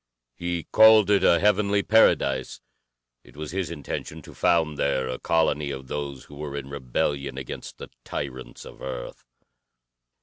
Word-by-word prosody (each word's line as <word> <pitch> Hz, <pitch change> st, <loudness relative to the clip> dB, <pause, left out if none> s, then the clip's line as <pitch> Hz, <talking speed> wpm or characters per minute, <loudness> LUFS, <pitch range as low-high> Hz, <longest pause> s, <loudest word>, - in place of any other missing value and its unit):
He 85 Hz, +1 st, -3 dB
called 110 Hz, -2 st, +6 dB
it 100 Hz, -, +3 dB
a 85 Hz, -, +5 dB
heavenly 100 Hz, 0 st, +2 dB
paradise. 70 Hz, -, +3 dB, 0.6 s
It -, -, -19 dB
was 75 Hz, -1 st, -6 dB
his 95 Hz, 0 st, -2 dB
intention 80 Hz, -1 st, -6 dB
to -, -, -12 dB
found 80 Hz, -3 st, +2 dB
there 65 Hz, -2 st, 0 dB
a 65 Hz, 0 st, -4 dB
colony 75 Hz, -3 st, +1 dB
of 65 Hz, -2 st, -7 dB
those 70 Hz, -2 st, -5 dB
who -, -, -16 dB
were 70 Hz, -1 st, -5 dB
in 70 Hz, -1 st, -6 dB
rebellion 70 Hz, 0 st, -2 dB
against 65 Hz, -2 st, -7 dB
the -, -, -9 dB
tyrants 65 Hz, -2 st, -6 dB
of -, -, -13 dB
Earth. 65 Hz, -2 st, -7 dB
75 Hz, 155 wpm, -25 LUFS, 65-85 Hz, 0.6 s, called